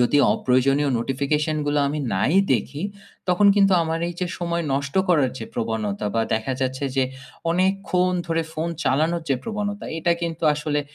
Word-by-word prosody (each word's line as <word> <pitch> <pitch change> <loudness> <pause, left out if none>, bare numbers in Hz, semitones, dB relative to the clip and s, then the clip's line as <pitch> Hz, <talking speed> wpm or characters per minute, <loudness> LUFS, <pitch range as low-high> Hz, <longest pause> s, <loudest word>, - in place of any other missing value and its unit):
যদি 125 +4 +4 0.2
অপ্রয়োজনীয় 135 +3 +2
notification 140 +5 0
গুলো 145 0 +1
আমি 150 +2 -2 0.2
নাই 130 - +1 0.2
দেখি, 130 +6 -2 0.5
তখন 180 +3 +4
কিন্তু 195 -1 +5
আমার 165 0 -1
এই 175 - -6
যে 180 - 0
সময় 170 -1 -1
নষ্ট 140 +1 -2
করার 150 -7 +3
যে 115 - -5
প্রবণতা 110 -2 -2
বা 115 - +2
দেখা 110 +4 -2
যাচ্ছে 130 +1 -1
যে 135 - +4 0.5
অনেকক্ষণ 185 0 +1
ধরে 165 -1 0
ফোন 160 +2 -2 0.2
চালানোর 160 +5 +1
যে 135 - +3
প্রবণতা 210 -1 -3
এটা 170 +1 +2
কিন্তু 165 -1 -3
আসলে 150 0 -1
150 Hz, 165 wpm, -23 LUFS, 130-170 Hz, 0.5 s, কিন্তু